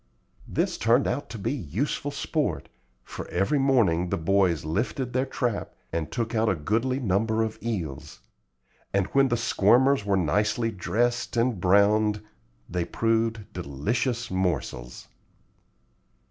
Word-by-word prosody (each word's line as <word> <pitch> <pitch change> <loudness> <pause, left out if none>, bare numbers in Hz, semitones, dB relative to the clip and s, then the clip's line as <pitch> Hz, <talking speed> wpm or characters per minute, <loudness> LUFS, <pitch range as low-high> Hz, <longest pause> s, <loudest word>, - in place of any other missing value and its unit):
This - - -1
turned 120 +4 +3
out 145 - -2
to 115 - -6
be 100 - -2
useful 130 - -2
sport, 140 - -2 0.3
for - - -8
every 100 +11 +1
morning 105 -11 +3
the - - 0
boys 90 -1 +2
lifted 120 - -2
their 130 +2 +1
trap 120 -5 -2 0.2
and 80 -2 -2
took 115 0 -2
out 110 -1 +2
a 95 - +2
goodly 115 - 0
number 110 0 +1
of 110 -1 -4
eels; 95 -12 -4 0.8
and 100 -1 +3
when 135 0 +5
the 120 -2 0
squirmers 120 +3 +3
were 100 -1 +1
nicely 105 +7 +1
dressed 120 +5 -1
and 115 -5 +1
browned, 105 +2 +3 0.4
they 90 0 -1
proved 115 +2 -1
delicious 100 - -2
morsels. 85 -10 -2
110 Hz, 130 wpm, -26 LUFS, 90-120 Hz, 0.8 s, when